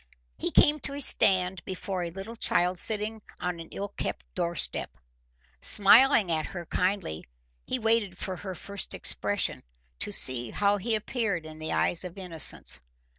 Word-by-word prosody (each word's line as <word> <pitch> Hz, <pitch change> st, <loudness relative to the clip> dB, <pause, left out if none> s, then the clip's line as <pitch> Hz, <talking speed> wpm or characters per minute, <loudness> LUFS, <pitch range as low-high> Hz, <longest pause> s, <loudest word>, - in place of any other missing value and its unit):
He -, -, -2 dB
came 300 Hz, +1 st, +4 dB
to 275 Hz, -, -3 dB
a -, -, -4 dB
stand 185 Hz, -8 st, +3 dB
before 185 Hz, 0 st, -4 dB
a 170 Hz, -, -3 dB
little 195 Hz, +6 st, -8 dB
child 180 Hz, -5 st, +2 dB
sitting 215 Hz, 0 st, +3 dB, 0.2 s
on 180 Hz, -1 st, -3 dB
an 165 Hz, -, -9 dB
ill 200 Hz, +1 st, -5 dB
kept -, -, -5 dB
doorstep. 170 Hz, -3 st, -1 dB, 0.7 s
Smiling 215 Hz, 0 st, +5 dB
at 155 Hz, -1 st, 0 dB
her 175 Hz, -2 st, -7 dB
kindly, 180 Hz, -, -2 dB, 0.4 s
he 255 Hz, -, 0 dB
waited 225 Hz, -5 st, +1 dB
for 185 Hz, -1 st, -4 dB
her 190 Hz, +1 st, -6 dB
first 200 Hz, +4 st, -6 dB
expression -, -, -2 dB, 0.4 s
to -, -, -2 dB
see 120 Hz, -2 st, +2 dB
how 205 Hz, -, +1 dB
he 220 Hz, +3 st, 0 dB
appeared 210 Hz, -6 st, -2 dB
in 155 Hz, 0 st, -10 dB
the 155 Hz, -, -4 dB
eyes 175 Hz, -, +1 dB
of 180 Hz, +1 st, -8 dB
innocence. 175 Hz, -5 st, +1 dB
190 Hz, 160 wpm, -28 LUFS, 175-210 Hz, 0.7 s, Smiling